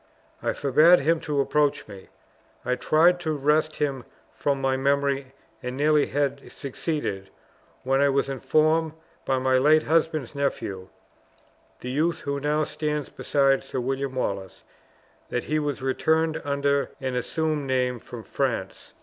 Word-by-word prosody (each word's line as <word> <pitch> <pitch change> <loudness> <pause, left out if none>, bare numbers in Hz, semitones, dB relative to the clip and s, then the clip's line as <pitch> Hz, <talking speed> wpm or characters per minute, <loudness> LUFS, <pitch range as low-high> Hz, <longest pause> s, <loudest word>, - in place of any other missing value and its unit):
I - - 0
forbade 155 +5 +5
him 165 +3 +2
to 145 -2 0
approach 145 +1 +1
me. 100 -2 -11 0.6
I 125 - +1
tried 160 +7 +3
to 160 -3 -2
wrest 150 +2 +1
him 140 -4 -2 0.3
from 140 -1 -1
my 135 0 +1
memory; 140 0 0 0.3
and 125 +1 -5
nearly 150 0 +3
had 140 -1 -2
succeeded, 135 - -4 0.5
when 135 +1 +2
I 140 - +4
was 140 0 +1
informed 155 +4 +1 0.3
by 135 - +1
my 130 0 +2
late 155 +3 +5
husband's 155 -4 0
nephew 105 -10 -3 0.9
(the 125 - -5
youth 160 +5 0
who 140 0 -2
now 150 +2 +1
stands 150 -1 -3
beside 135 -1 +1
Sir 130 - -4
William 135 +1 -2
Wallace) 100 -6 -3 0.7
that 120 - -2
he 155 0 0
was 145 -3 -3
returned 160 +4 +1
under 140 0 0
an 130 -1 -3
assumed 150 +3 -1
name 125 -2 0
from 115 0 -10
France. 120 -9 -3
140 Hz, 145 wpm, -25 LUFS, 130-155 Hz, 0.9 s, forbade